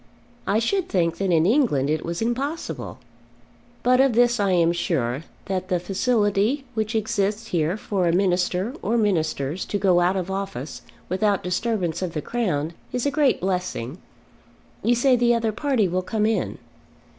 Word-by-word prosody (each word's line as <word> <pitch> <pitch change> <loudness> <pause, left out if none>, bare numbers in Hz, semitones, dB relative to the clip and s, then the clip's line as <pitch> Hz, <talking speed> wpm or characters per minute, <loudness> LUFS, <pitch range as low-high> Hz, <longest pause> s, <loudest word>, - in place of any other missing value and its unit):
I 205 - +2
should 360 - 0
think 170 -3 +1
that 195 -1 0
in 165 -1 +4
England 215 - +2
it 155 +1 0
was 170 +5 -3
impossible. 275 +8 -3 0.9
But 250 +1 +4
of 270 -2 +3
this 240 0 +3
I 200 -1 +2
am 170 -2 +3
sure, 160 -6 -1 0.2
that 185 -1 -2
the 180 -2 +1
facility 205 - +1
which 220 0 -2
exists 220 0 -1
here 170 +2 0
for 195 -4 -1
a - - +3
minister 180 +3 +1
or 230 +3 0
ministers 165 -6 0
to 205 - -2
go 185 -3 +3
out 180 +2 +2
of 185 0 -3
office 190 -9 -5 0.3
without 200 +1 +1
disturbance 180 -2 -1
of 180 -3 -3
the 150 - -2
Crown, 170 -10 -1 0.2
is 250 0 -2
a 285 - +2
great 285 -2 +2
blessing. 180 -6 -2 0.8
You 240 - +3
say 255 +2 +4
the 240 0 +3
other 225 -1 0
party 250 -3 +1
will 180 +1 -1
come 210 +3 -1
in." 220 0 0
195 Hz, 170 wpm, -24 LUFS, 175-230 Hz, 0.9 s, in